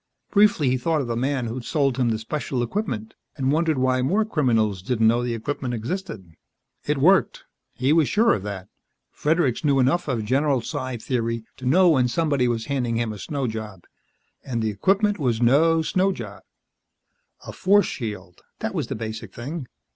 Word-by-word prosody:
Briefly 205 Hz, -8 st, +4 dB
he 130 Hz, -, 0 dB
thought 155 Hz, +3 st, 0 dB
of -, -, -3 dB
the 120 Hz, -1 st, -2 dB
man 130 Hz, +1 st, -1 dB
who'd 120 Hz, +2 st, -5 dB
sold 140 Hz, -2 st, 0 dB
him 125 Hz, -3 st, +2 dB
the 110 Hz, -, 0 dB
special 125 Hz, +2 st, -3 dB
equipment, 120 Hz, -, -3 dB, 0.2 s
and 135 Hz, -1 st, +1 dB
wondered 160 Hz, -1 st, +1 dB
why 130 Hz, 0 st, +2 dB
more 195 Hz, +12 st, +1 dB
criminals 115 Hz, -, +1 dB
didn't 115 Hz, +3 st, 0 dB
know 120 Hz, +2 st, +3 dB
the 120 Hz, -1 st, -2 dB
equipment 125 Hz, +1 st, -3 dB
existed. 115 Hz, -, -5 dB, 0.6 s
It 150 Hz, 0 st, +1 dB
worked; 180 Hz, +8 st, +3 dB, 0.3 s
he 130 Hz, +4 st, +2 dB
was 160 Hz, -3 st, +3 dB
sure 225 Hz, +2 st, +4 dB
of 100 Hz, -, -2 dB
that. 100 Hz, -1 st, -6 dB, 0.4 s
Fredericks 150 Hz, -5 st, 0 dB
knew 140 Hz, -2 st, +3 dB
enough 135 Hz, +7 st, +2 dB
of 120 Hz, -6 st, -1 dB
general 135 Hz, +2 st, +1 dB
psi 130 Hz, -1 st, -4 dB
theory 115 Hz, -1 st, -2 dB
to 130 Hz, -, -5 dB
know 180 Hz, +7 st, +5 dB
when 130 Hz, -5 st, +3 dB
somebody 140 Hz, -2 st, +1 dB
was 115 Hz, -2 st, -1 dB
handing 125 Hz, -4 st, -1 dB
him 115 Hz, -2 st, -1 dB
a 105 Hz, -, -9 dB
snow 140 Hz, +2 st, -3 dB
job. 110 Hz, -5 st, -6 dB, 0.6 s
And 120 Hz, -4 st, -3 dB
the 110 Hz, -, 0 dB
equipment 195 Hz, -, +1 dB
was 120 Hz, -6 st, 0 dB
no 160 Hz, +7 st, +4 dB
snow 185 Hz, +4 st, +1 dB
job. 105 Hz, -, -8 dB, 1.0 s
A -, -, -7 dB
force 200 Hz, 0 st, +3 dB
shield, 105 Hz, -7 st, -6 dB, 0.2 s
that -, -, -4 dB
was -, -, -2 dB
the -, -, -4 dB
basic 110 Hz, -2 st, -6 dB
thing. 140 Hz, +3 st, -6 dB
130 Hz, 185 wpm, -23 LUFS, 115-155 Hz, 1.0 s, know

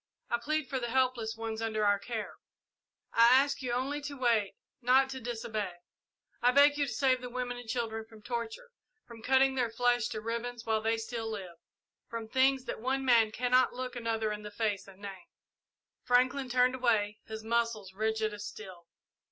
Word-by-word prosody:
I 235 Hz, -, +2 dB
plead 310 Hz, +3 st, -1 dB
for 265 Hz, -, -2 dB
the 240 Hz, -1 st, -3 dB
helpless 250 Hz, -3 st, +1 dB
ones 225 Hz, 0 st, -4 dB
under 215 Hz, -2 st, 0 dB
our 205 Hz, 0 st, +3 dB
care. 220 Hz, +1 st, -5 dB, 0.8 s
I 230 Hz, 0 st, +7 dB
ask 275 Hz, +2 st, +3 dB
you 250 Hz, -2 st, -2 dB
only 270 Hz, +4 st, -1 dB
to 285 Hz, 0 st, -6 dB
wait, 230 Hz, -6 st, +1 dB, 0.3 s
not 260 Hz, +2 st, +4 dB
to 265 Hz, -, -5 dB
disobey. 220 Hz, -5 st, -3 dB, 0.7 s
I 245 Hz, -, +5 dB
beg 285 Hz, +2 st, +6 dB
you 290 Hz, -1 st, 0 dB
to -, -, -4 dB
save 255 Hz, +2 st, +2 dB
the 250 Hz, -, -6 dB
women 245 Hz, 0 st, -3 dB
and 245 Hz, -2 st, -10 dB
children 225 Hz, -2 st, -2 dB
from 220 Hz, -1 st, -16 dB
torture 235 Hz, -, -5 dB, 0.3 s
from 230 Hz, -2 st, -12 dB
cutting 265 Hz, +2 st, +4 dB
their 250 Hz, -3 st, 0 dB
flesh 245 Hz, 0 st, +2 dB
to 215 Hz, -, -4 dB
ribbons 235 Hz, +1 st, -4 dB
while 220 Hz, -1 st, +1 dB
they 225 Hz, +1 st, +1 dB
still 225 Hz, 0 st, -4 dB
live 190 Hz, -6 st, -6 dB, 0.5 s
from 230 Hz, -1 st, -5 dB
things 265 Hz, +2 st, +2 dB
that -, -, -5 dB
one 265 Hz, +2 st, -1 dB
man 230 Hz, -4 st, +5 dB
cannot 250 Hz, +2 st, +3 dB
look 255 Hz, 0 st, -5 dB
another 225 Hz, -2 st, -1 dB
in 210 Hz, 0 st, -4 dB
the 210 Hz, -, -7 dB
face 205 Hz, -2 st, -2 dB
and 195 Hz, +1 st, -15 dB
name." 195 Hz, -3 st, -8 dB, 0.7 s
Franklin 255 Hz, +2 st, +2 dB
turned 250 Hz, +1 st, +3 dB
away, 220 Hz, -5 st, +1 dB
his 220 Hz, 0 st, -6 dB
muscles 225 Hz, -4 st, -1 dB
rigid 220 Hz, +1 st, 0 dB
as 205 Hz, 0 st, -7 dB
steel. 185 Hz, -5 st, -9 dB
235 Hz, 185 wpm, -31 LUFS, 220-255 Hz, 0.8 s, I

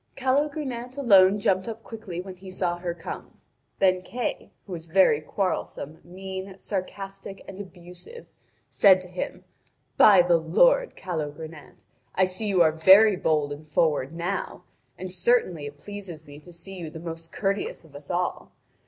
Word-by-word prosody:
Calogrenant 265 Hz, -2 st, -1 dB
alone 200 Hz, -6 st, +6 dB
jumped 190 Hz, 0 st, +1 dB
up 225 Hz, 0 st, -6 dB
quickly 215 Hz, -6 st, -7 dB
when 185 Hz, 0 st, -7 dB
he 185 Hz, +1 st, -12 dB
saw 180 Hz, -2 st, -2 dB
her 175 Hz, -1 st, -3 dB
come. 170 Hz, 0 st, -8 dB, 0.4 s
Then 185 Hz, -2 st, +3 dB
Kay, 240 Hz, +5 st, -4 dB, 0.2 s
who 195 Hz, -, -12 dB
was 165 Hz, -2 st, -6 dB
very 165 Hz, -3 st, +4 dB
quarrelsome, 160 Hz, -3 st, -3 dB
mean, 190 Hz, +1 st, -7 dB
sarcastic, 195 Hz, 0 st, -6 dB
and 195 Hz, +1 st, -7 dB
abusive, 180 Hz, -, -7 dB, 0.4 s
said 190 Hz, -2 st, +6 dB
to 185 Hz, -, -10 dB
him: 180 Hz, 0 st, -5 dB, 0.5 s
"By 195 Hz, -4 st, +8 dB
the 175 Hz, -1 st, +4 dB
Lord, -, -, +3 dB
Calogrenant, 160 Hz, -2 st, -7 dB, 0.3 s
I 190 Hz, -, +4 dB
see 185 Hz, +4 st, -1 dB
you 190 Hz, -4 st, +4 dB
are 160 Hz, -, +4 dB
very 190 Hz, +6 st, +7 dB
bold 155 Hz, -4 st, 0 dB
and 150 Hz, +2 st, -8 dB
forward 150 Hz, -3 st, +1 dB
now, 175 Hz, +4 st, -4 dB, 0.3 s
and 185 Hz, 0 st, -6 dB
certainly 180 Hz, -6 st, +1 dB
it 145 Hz, 0 st, -10 dB
pleases 185 Hz, -3 st, -9 dB
me 145 Hz, 0 st, -12 dB
to 175 Hz, +4 st, -15 dB
see 180 Hz, +3 st, -10 dB
you 165 Hz, -2 st, -5 dB
the 160 Hz, +1 st, -9 dB
most 165 Hz, 0 st, -7 dB
courteous 200 Hz, -4 st, -2 dB
of 145 Hz, -3 st, -18 dB
us 145 Hz, 0 st, -11 dB
all. 180 Hz, 0 st, -2 dB
185 Hz, 160 wpm, -26 LUFS, 165-200 Hz, 0.5 s, By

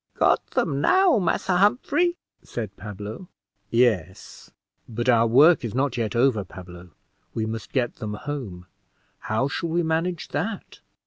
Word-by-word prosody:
"Got -, -, +3 dB
them 140 Hz, 0 st, -1 dB
now, 370 Hz, -, +4 dB
Massa 180 Hz, 0 st, 0 dB
Humphrey," 280 Hz, -, +2 dB, 0.2 s
said 105 Hz, -4 st, -6 dB
Pablo. 105 Hz, -, -8 dB, 0.4 s
"Yes; 110 Hz, -8 st, 0 dB, 0.4 s
but 120 Hz, +2 st, -3 dB
our 115 Hz, -2 st, +4 dB
work 145 Hz, +9 st, +6 dB
is 115 Hz, -1 st, -4 dB
not 135 Hz, -1 st, 0 dB
yet 115 Hz, -2 st, -2 dB
over, 120 Hz, -4 st, +2 dB
Pablo; 90 Hz, -1 st, -12 dB, 0.5 s
we 110 Hz, -, -1 dB
must 110 Hz, -1 st, -6 dB
get 125 Hz, -3 st, -1 dB
them 105 Hz, -3 st, -5 dB
home; 105 Hz, -9 st, -6 dB, 0.5 s
how 110 Hz, +5 st, -1 dB
shall 165 Hz, +4 st, -3 dB
we 170 Hz, +2 st, +1 dB
manage 165 Hz, +1 st, -1 dB
that?" 200 Hz, +9 st, -4 dB
125 Hz, 140 wpm, -24 LUFS, 110-165 Hz, 0.5 s, work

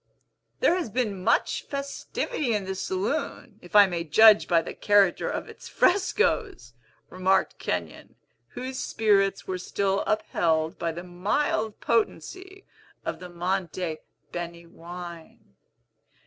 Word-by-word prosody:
"There 480 Hz, -, +5 dB
has 360 Hz, -8 st, -2 dB
been 210 Hz, -5 st, -2 dB
much -, -, +2 dB
festivity 280 Hz, -, -3 dB
in 205 Hz, -2 st, -2 dB
this 190 Hz, 0 st, -4 dB
saloon, 215 Hz, +2 st, -3 dB
if 175 Hz, -, -12 dB
I 205 Hz, -1 st, +10 dB
may 175 Hz, -3 st, -3 dB
judge 210 Hz, +7 st, +6 dB
by 165 Hz, -2 st, +3 dB
the -, -, -6 dB
character 205 Hz, -3 st, +3 dB
of -, -, -4 dB
its -, -, -12 dB
frescos," 390 Hz, -, +1 dB, 0.4 s
remarked 185 Hz, +1 st, +1 dB
Kenyon, 85 Hz, -3 st, -4 dB, 0.4 s
whose 260 Hz, +1 st, -5 dB
spirits 195 Hz, -3 st, +1 dB
were 185 Hz, -1 st, -3 dB
still 195 Hz, +2 st, 0 dB
upheld 165 Hz, -7 st, 0 dB
by 170 Hz, -, -1 dB
the 170 Hz, +2 st, -7 dB
mild 210 Hz, +5 st, -1 dB
potency 375 Hz, -, -2 dB, 0.4 s
of -, -, -3 dB
the 180 Hz, -, -9 dB
Monte 175 Hz, -2 st, -2 dB, 0.3 s
Beni 170 Hz, 0 st, -6 dB
wine. 170 Hz, -, -11 dB
195 Hz, 125 wpm, -26 LUFS, 175-230 Hz, 0.4 s, I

